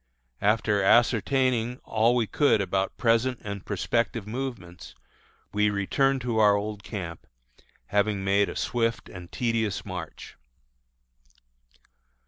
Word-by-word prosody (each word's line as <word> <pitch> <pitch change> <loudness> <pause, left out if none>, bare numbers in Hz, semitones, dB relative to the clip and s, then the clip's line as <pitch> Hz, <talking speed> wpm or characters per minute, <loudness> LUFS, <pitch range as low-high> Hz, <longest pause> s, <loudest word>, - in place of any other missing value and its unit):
After 105 -1 +2
ascertaining 120 +3 +2
all 115 +2 +2
we 120 -2 +2
could 140 +1 +2
about 95 0 -1
present 120 +2 +2
and 100 -2 -6
prospective 115 +2 -1
movements, 110 -7 -6 0.6
we 105 0 +2
returned 130 +7 +1
to 120 -2 -1
our 105 -1 +5
old 105 0 -4
camp, 90 -6 -7 0.6
having 100 -1 0
made 100 +1 +2
a - - -7
swift 115 -1 -1
and 90 -2 -11
tedious 115 -4 -1
march. 90 -5 -8
110 Hz, 110 wpm, -26 LUFS, 100-120 Hz, 0.6 s, our